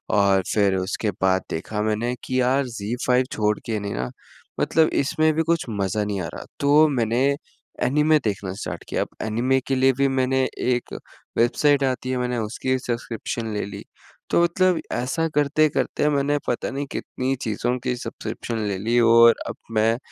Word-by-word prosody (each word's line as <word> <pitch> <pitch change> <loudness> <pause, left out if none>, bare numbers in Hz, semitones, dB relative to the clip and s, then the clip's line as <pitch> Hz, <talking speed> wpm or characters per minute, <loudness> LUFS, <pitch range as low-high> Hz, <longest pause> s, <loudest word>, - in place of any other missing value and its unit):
और 100 -2 +4
फिर 100 -3 +3
उसके 95 +3 -2
बाद 95 0 +3
देखा 105 +6 -3
मैंने 110 +3 -1
कि 130 0 0
यार 130 +2 +2
ज़ी 115 -1 -4
फाइव 125 0 +4
छोड़ 105 -1 +1
के 110 -2 -1
नहीं 100 0 -4
ना 60 +1 -3 0.5
मतलब 160 0 +3
इसमें 155 +2 +2
भी 160 +1 +1
कुछ 165 0 0
मज़ा 100 0 -1
नहीं 100 -2 -2
आ 85 - -3
रहा, - - -8
तो 145 +2 +5
मैंने 120 -1 +1 0.6
एनीमे 150 +3 +4
देखना 100 -2 -2
स्टार्ट - - -5
किया - - -1
अब - - -9 0.2
एनीमे 120 +5 +1
के 135 - +1
लिए 130 +1 +4
भी 140 0 +3
मैंने 130 0 +1 0.2
एक 125 -1 -1 0.4
वेबसाइट 140 +4 +3
आती 130 -1 -1
है 130 - 0
मैंने 125 0 -1
उसकी 125 +4 -1
सब्सक्रिप्शन 115 -2 -4
ले 105 - -2
ली। 100 - -8 0.5
तो - - +3
मतलब 180 +1 +2
ऐसा 130 +7 -1
करते-करते 150 0 +2
मैंने 145 0 +1
पता 120 - -1
नहीं 140 +1 -3
कितनी 130 +1 -2
चीज़ों 120 +3 -1
की 125 -1 0
सब्सक्रिप्शन 115 -1 -5
ले 100 -2 -2
ली 115 +4 +1
और 115 0 +7
अब - - -5 0.2
मैं 110 +1 +2
125 Hz, 175 wpm, -23 LUFS, 110-135 Hz, 0.6 s, और